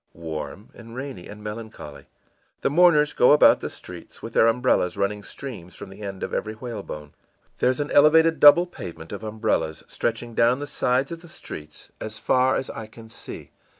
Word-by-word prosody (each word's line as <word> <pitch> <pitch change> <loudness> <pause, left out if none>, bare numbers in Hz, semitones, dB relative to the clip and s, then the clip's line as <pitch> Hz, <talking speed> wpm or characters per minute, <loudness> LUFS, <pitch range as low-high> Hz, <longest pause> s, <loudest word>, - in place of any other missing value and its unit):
î - - -16
ìWarm 80 +4 -6
and 115 0 -12
rainy 130 -9 -7
and 105 0 -11
melancholy. 105 -9 -8 0.5
The - - +1
mourners 150 -2 +5
go 125 - +6
about 150 - +6
the - - -4
streets - - -12
with - - -7
their 115 - +5
umbrellas 115 -6 +2
running 100 +1 -1
streams 100 -6 -9
from - - -9
the 95 - -12
end 95 -2 -6
of - - -4
every 110 0 -2
whalebone. 100 - -7 0.5
There's 125 +1 +2
an 145 0 -2
elevated 160 +2 +5
double 150 +4 +8
pavement 85 - -9
of 100 - -6
umbrellas, 105 -8 -1
stretching 120 0 -3
down 120 +3 +3
the 145 - -5
sides 135 -1 0
of 165 -1 -6
the 175 - -13
streets 75 - -10
as 110 0 -6
far 130 +3 +2
as 130 - -3
I 110 - -7
can 110 0 -14
see. 115 - -10
115 Hz, 185 wpm, -24 LUFS, 100-135 Hz, 0.5 s, double